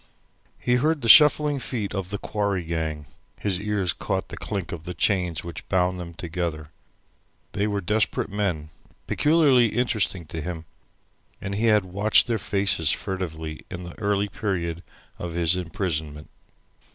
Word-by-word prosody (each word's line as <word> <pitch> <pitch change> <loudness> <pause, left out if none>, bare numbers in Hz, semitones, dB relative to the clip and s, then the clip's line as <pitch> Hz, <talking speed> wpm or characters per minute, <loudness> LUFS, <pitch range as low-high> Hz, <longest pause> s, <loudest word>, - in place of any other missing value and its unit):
He 125 0 +1
heard 155 +3 +1
the 115 - -2
shuffling 150 +2 +7
feet 110 -6 -3
of 95 -3 -3
the 100 - -3
quarry 100 -3 -1
gang, 80 -2 -3 0.3
his 95 -4 0
ears 100 -5 0
caught - - -3
the - - -6
clink 95 -4 -4
of 85 - -5
the 90 0 -6
chains 90 -2 +1
which 85 -1 -8
bound 90 -1 +1
them 85 -1 -7
together. 85 -3 -4 0.8
They 105 0 0
were 100 -1 -1
desperate 105 +2 0
men, 90 -7 -2 0.3
peculiarly 145 -6 +4
interesting 110 -6 0
to 80 +1 -6
him, 85 0 -5 0.7
and 100 - -4
he 110 +3 +1
had 105 -3 +4
watched 100 +4 +3
their 115 -2 -1
faces 100 -5 +1
furtively 80 -5 -3
in 90 -1 -6
the 85 0 -10
early 100 -1 +1
period 90 -5 -3 0.4
of 85 -1 -5
his 85 0 +2
imprisonment. 80 -4 -3
95 Hz, 150 wpm, -25 LUFS, 85-105 Hz, 0.8 s, shuffling